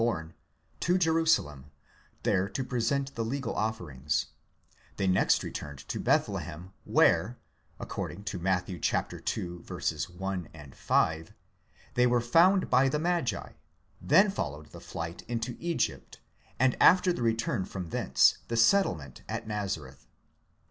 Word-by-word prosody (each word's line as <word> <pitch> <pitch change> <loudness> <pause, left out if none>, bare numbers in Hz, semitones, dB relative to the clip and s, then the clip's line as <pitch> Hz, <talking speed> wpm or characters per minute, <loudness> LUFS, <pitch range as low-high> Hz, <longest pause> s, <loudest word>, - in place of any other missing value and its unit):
born, 85 -9 -1 0.5
to 180 +1 +2
Jerusalem, 160 - +1 0.5
there 95 0 +1
to 135 - -3
present 135 +2 -1
the 115 - -2
legal 125 +1 -3
offerings; 80 -11 -2 0.7
they 100 - 0
next 95 0 +3
returned 70 -2 -7
to - - -3
Bethlehem, 90 +5 -1
where - - +3 0.4
(according 100 - -5
to 95 - -4
Matt. 90 0 0
ii. 90 -3 -7
1 90 +1 -3
and 75 -4 -12
5) 80 0 0 0.6
they 125 0 +4
were 120 0 +3
found 170 +11 +4
by 130 +1 +5
the 150 - 0
magi; 170 -3 -1 0.5
then 190 +8 +5
followed 75 - -5
the - - -11
flight 85 +1 -6
into 115 0 -3
Egypt, 170 -1 -2 0.4
and 130 0 +3
after 180 0 +6
the 125 - -5
return 115 -4 0
from 90 -2 -6
thence, 65 -4 +3
the 115 - -2
settlement 115 - +2
at - - -4
Nazareth. 95 -11 -5
105 Hz, 130 wpm, -29 LUFS, 85-135 Hz, 0.7 s, after